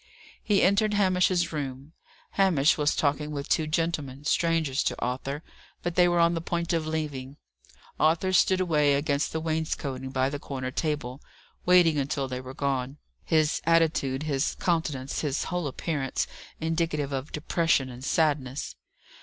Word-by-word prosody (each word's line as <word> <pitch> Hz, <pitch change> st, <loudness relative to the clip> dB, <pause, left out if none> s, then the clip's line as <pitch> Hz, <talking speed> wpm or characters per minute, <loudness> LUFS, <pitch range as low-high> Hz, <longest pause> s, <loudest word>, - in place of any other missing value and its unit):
He 205 Hz, -2 st, +3 dB
entered 205 Hz, +3 st, +3 dB
Hamish's 180 Hz, -3 st, +2 dB
room. 140 Hz, 0 st, -5 dB, 0.4 s
Hamish 170 Hz, -7 st, +3 dB
was 150 Hz, -1 st, +1 dB
talking 150 Hz, 0 st, 0 dB
with 140 Hz, -2 st, -4 dB
two 155 Hz, -, +1 dB
gentlemen, 150 Hz, -4 st, -2 dB
strangers 160 Hz, -4 st, +1 dB
to -, -, -1 dB
Arthur, 135 Hz, +4 st, -3 dB, 0.4 s
but 175 Hz, -, -1 dB
they 180 Hz, 0 st, +5 dB
were 175 Hz, 0 st, +2 dB
on 170 Hz, 0 st, +4 dB
the 165 Hz, -, -2 dB
point 170 Hz, 0 st, -2 dB
of 160 Hz, -2 st, 0 dB
leaving. 145 Hz, -4 st, -4 dB, 0.6 s
Arthur 165 Hz, +4 st, +2 dB
stood 185 Hz, +1 st, +4 dB
away 150 Hz, -6 st, +3 dB
against 140 Hz, 0 st, 0 dB
the 160 Hz, -, -2 dB
wainscoting 155 Hz, -5 st, -2 dB
by 130 Hz, 0 st, 0 dB
the 145 Hz, -, -4 dB
corner 130 Hz, -2 st, -5 dB
table, 145 Hz, -3 st, -3 dB, 0.5 s
waiting 175 Hz, -4 st, +5 dB
until 140 Hz, 0 st, -1 dB
they 125 Hz, -1 st, -4 dB
were 130 Hz, +1 st, -9 dB
gone, 135 Hz, -1 st, -2 dB, 0.3 s
his 155 Hz, -2 st, +2 dB
attitude, 160 Hz, -5 st, +2 dB
his 140 Hz, -3 st, 0 dB
countenance, 150 Hz, -6 st, -1 dB
his 145 Hz, -1 st, -1 dB
whole 180 Hz, -4 st, -2 dB
appearance 140 Hz, -1 st, -2 dB, 0.3 s
indicative 160 Hz, -3 st, -1 dB
of 135 Hz, +2 st, -4 dB
depression 155 Hz, -2 st, +1 dB
and 125 Hz, +1 st, -10 dB
sadness. 145 Hz, -3 st, 0 dB
150 Hz, 150 wpm, -27 LUFS, 135-165 Hz, 0.6 s, they